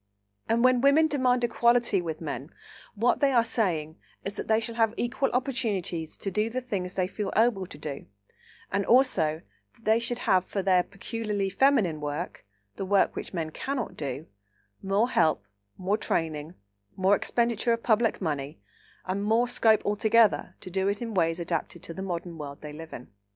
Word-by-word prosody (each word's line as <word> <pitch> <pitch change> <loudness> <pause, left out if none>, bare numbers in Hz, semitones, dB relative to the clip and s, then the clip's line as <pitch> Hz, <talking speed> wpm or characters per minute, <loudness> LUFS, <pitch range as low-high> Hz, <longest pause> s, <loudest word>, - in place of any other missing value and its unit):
And, 230 +1 +2
when 255 -1 +5
women 280 +4 +5
demand 255 -4 +1
"equality" 235 -3 +3
with 160 -2 -5
men, 145 -2 -5 0.5
what 230 +4 +2
they 280 -2 +3
are 240 -3 +5
asking 170 -9 -1 0.3
is, 200 - -4
that - - -5
they 220 0 +3
shall 230 +1 -3
have 225 -1 +1
equal 265 +3 0
opportunities 210 - -2
to 195 - -4
do 210 +4 0
the 250 +3 -2
things 195 -8 -4
they 185 - +1
feel 200 +1 -4
able 220 -5 +2
to 145 - -10
do, 145 -2 -6 0.6
and 200 +1 +1
also 175 - +3 0.3
that 230 - -25
they 220 +1 +4
should 240 +1 -2
have 185 -6 +2
for 195 - -3
their 185 -1 +4
peculiarly 205 0 -3
feminine 200 - +3
work—the 105 - -6
work 195 +1 +2
which - - -6
men 165 -4 -3
cannot 265 - -4
do—more 135 - -4
help, 155 - +2 0.3
more 195 +4 0
training, 160 -3 -2 0.4
more 190 +2 +4
expenditure 235 +1 0
of 230 - -3
public 225 0 +2
money, 145 - -3 0.5
and 190 +2 -2
more 225 +3 +2
scope 225 -3 +3
altogether 220 +1 +3
to 185 - -9
do 190 +1 0
it 205 +3 -1
in 230 -2 -5
ways 165 -2 +1
adapted 170 0 -3
to 165 - -7
the 190 - -7
modern 175 -3 -5
world 140 -1 -7
they 150 -1 -8
live 160 +1 -9
in. 125 - -10
195 Hz, 175 wpm, -27 LUFS, 165-230 Hz, 0.6 s, when